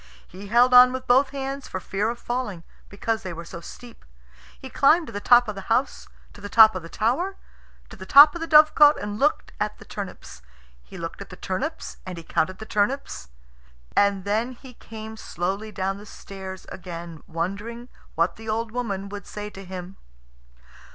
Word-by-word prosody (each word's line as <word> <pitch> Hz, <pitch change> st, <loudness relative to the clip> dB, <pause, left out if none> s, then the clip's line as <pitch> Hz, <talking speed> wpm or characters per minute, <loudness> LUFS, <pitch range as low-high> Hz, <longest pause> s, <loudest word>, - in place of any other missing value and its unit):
He 195 Hz, +3 st, -11 dB
held 240 Hz, +4 st, +4 dB
on 250 Hz, 0 st, +9 dB
with 260 Hz, 0 st, -5 dB
both 260 Hz, +3 st, +4 dB
hands 275 Hz, 0 st, -5 dB
for 185 Hz, -, -5 dB
fear 200 Hz, +4 st, -2 dB
of 235 Hz, -, -4 dB
falling, 240 Hz, -9 st, -4 dB, 0.3 s
because 220 Hz, +3 st, -2 dB
they 185 Hz, -5 st, -6 dB
were 170 Hz, +1 st, -8 dB
so 170 Hz, +1 st, -9 dB
steep. 240 Hz, +7 st, -12 dB, 0.6 s
He 265 Hz, -, -8 dB
climbed 310 Hz, +6 st, +3 dB
to 230 Hz, -, -10 dB
the 205 Hz, -, -3 dB
top 240 Hz, +2 st, +5 dB
of 215 Hz, -, -3 dB
the 195 Hz, -1 st, -10 dB
house, 245 Hz, +4 st, 0 dB, 0.3 s
to -, -, -14 dB
the 205 Hz, -, -7 dB
top 220 Hz, 0 st, +8 dB
of 185 Hz, -, -4 dB
the 165 Hz, -, -11 dB
tower, 265 Hz, -, -1 dB, 0.6 s
to -, -, -9 dB
the 190 Hz, -3 st, -11 dB
top 290 Hz, +5 st, +9 dB
of 345 Hz, -, -7 dB
the 330 Hz, -, -3 dB
dovecot, 300 Hz, -1 st, +7 dB
and 205 Hz, +1 st, -5 dB
looked 295 Hz, +2 st, +1 dB
at 210 Hz, 0 st, -2 dB
the -, -, -14 dB
turnips. 195 Hz, -, -8 dB, 0.4 s
He 60 Hz, -, -13 dB
looked -, -, -7 dB
at -, -, -9 dB
the -, -, -10 dB
turnips, -, -, -4 dB
and 185 Hz, -2 st, -7 dB
he 170 Hz, -, -8 dB
counted 185 Hz, +3 st, -1 dB
the 220 Hz, -, -8 dB
turnips, 210 Hz, -, -2 dB, 0.7 s
and 200 Hz, -1 st, +3 dB
then 220 Hz, +5 st, -1 dB
he 255 Hz, +1 st, -14 dB
came 220 Hz, -1 st, -10 dB
slowly 195 Hz, +3 st, -4 dB
down 195 Hz, -1 st, -3 dB
the 210 Hz, -, -13 dB
stairs 190 Hz, -1 st, -9 dB
again 170 Hz, -3 st, -8 dB
wondering 200 Hz, +8 st, -4 dB, 0.3 s
what 170 Hz, +2 st, 0 dB
the 220 Hz, 0 st, -8 dB
old 225 Hz, +1 st, -2 dB
woman 205 Hz, -5 st, -3 dB
would 205 Hz, -1 st, -8 dB
say 210 Hz, 0 st, -7 dB
to 195 Hz, -, -10 dB
him. 185 Hz, 0 st, -8 dB
215 Hz, 195 wpm, -24 LUFS, 190-245 Hz, 0.7 s, on